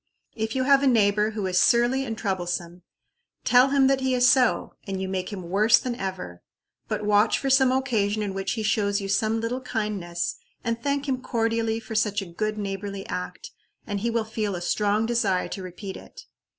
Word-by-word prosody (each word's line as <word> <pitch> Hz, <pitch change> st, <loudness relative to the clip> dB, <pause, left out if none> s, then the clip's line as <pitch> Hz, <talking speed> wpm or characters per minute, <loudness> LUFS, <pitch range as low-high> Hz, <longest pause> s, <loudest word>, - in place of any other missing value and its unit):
If 220 Hz, +1 st, -3 dB
you 260 Hz, -, +1 dB
have 275 Hz, +1 st, +5 dB
a 280 Hz, -, +2 dB
neighbor 210 Hz, -3 st, +3 dB
who 215 Hz, -2 st, -4 dB
is 180 Hz, -1 st, +2 dB
surly 240 Hz, +5 st, +3 dB
and 225 Hz, -3 st, -4 dB
troublesome 175 Hz, -3 st, -3 dB, 0.6 s
tell 250 Hz, +2 st, +5 dB
him 275 Hz, -1 st, +4 dB
that 270 Hz, 0 st, +3 dB
he 260 Hz, -1 st, +1 dB
is 250 Hz, 0 st, +4 dB
so, 255 Hz, -2 st, +3 dB
and 195 Hz, -1 st, -3 dB
you 190 Hz, -, -3 dB
make 190 Hz, +1 st, -3 dB
him 195 Hz, -3 st, -6 dB
worse 215 Hz, +5 st, +5 dB
than 250 Hz, -, -3 dB
ever. 190 Hz, -, -6 dB, 0.5 s
But 210 Hz, -, -3 dB
watch 210 Hz, +1 st, +3 dB
for 270 Hz, -, -1 dB
some 265 Hz, -1 st, +5 dB
occasion 220 Hz, -6 st, 0 dB
in 200 Hz, -2 st, -3 dB
which 195 Hz, 0 st, -2 dB
he 220 Hz, -, -3 dB
shows 205 Hz, -1 st, +1 dB
you 195 Hz, -, -4 dB
some 220 Hz, +3 st, +1 dB
little 235 Hz, +3 st, -3 dB
kindness, 205 Hz, -8 st, -3 dB, 0.3 s
and 230 Hz, 0 st, -2 dB
thank 280 Hz, +2 st, -1 dB
him 260 Hz, -2 st, -1 dB
cordially 225 Hz, -2 st, 0 dB
for 225 Hz, -, -9 dB
such 210 Hz, -1 st, +1 dB
a 195 Hz, -, -5 dB
good 215 Hz, +4 st, -2 dB
neighborly 200 Hz, -1 st, -4 dB
act, 180 Hz, -, -5 dB, 0.3 s
and 205 Hz, -1 st, -3 dB
he 235 Hz, +4 st, -1 dB
will 230 Hz, -1 st, 0 dB
feel 215 Hz, -3 st, -3 dB
a 175 Hz, -, -5 dB
strong 210 Hz, +4 st, +1 dB
desire 220 Hz, -6 st, +1 dB
to 195 Hz, -, -5 dB
repeat 190 Hz, +2 st, -7 dB
it. -, -, -12 dB
215 Hz, 205 wpm, -25 LUFS, 195-240 Hz, 0.6 s, have